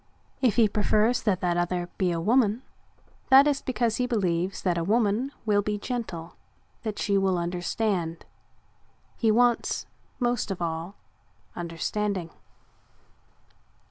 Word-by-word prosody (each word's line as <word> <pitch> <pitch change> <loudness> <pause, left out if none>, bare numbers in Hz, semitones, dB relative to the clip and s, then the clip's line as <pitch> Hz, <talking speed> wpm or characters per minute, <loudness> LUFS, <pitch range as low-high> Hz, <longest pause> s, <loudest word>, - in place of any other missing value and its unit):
If 245 -6 +3
he 225 -2 +5
prefers 215 +3 +2
that 200 -5 0
the 180 - +1
other 175 0 -1
be 185 -2 +2
a 170 - -1
woman, 225 +4 +2 0.7
that 270 +1 +8
is 290 -2 +1
because 235 -3 0
he 250 - 0
believes 185 -5 -1
that 180 -2 +1
a - - -1
woman 220 +6 +1
will 205 -2 +3
be 210 +1 -2
gentle, 205 -8 -5 0.5
that 215 -4 -4
she 200 -1 +1
will 190 -2 +1
understand. 175 0 -2 0.9
He 225 - +1
wants, 240 +2 +2 0.3
most 240 -3 0
of 195 - -3
all, 170 +3 -3 0.6
understanding. 175 +1 -3
205 Hz, 130 wpm, -26 LUFS, 175-235 Hz, 0.9 s, that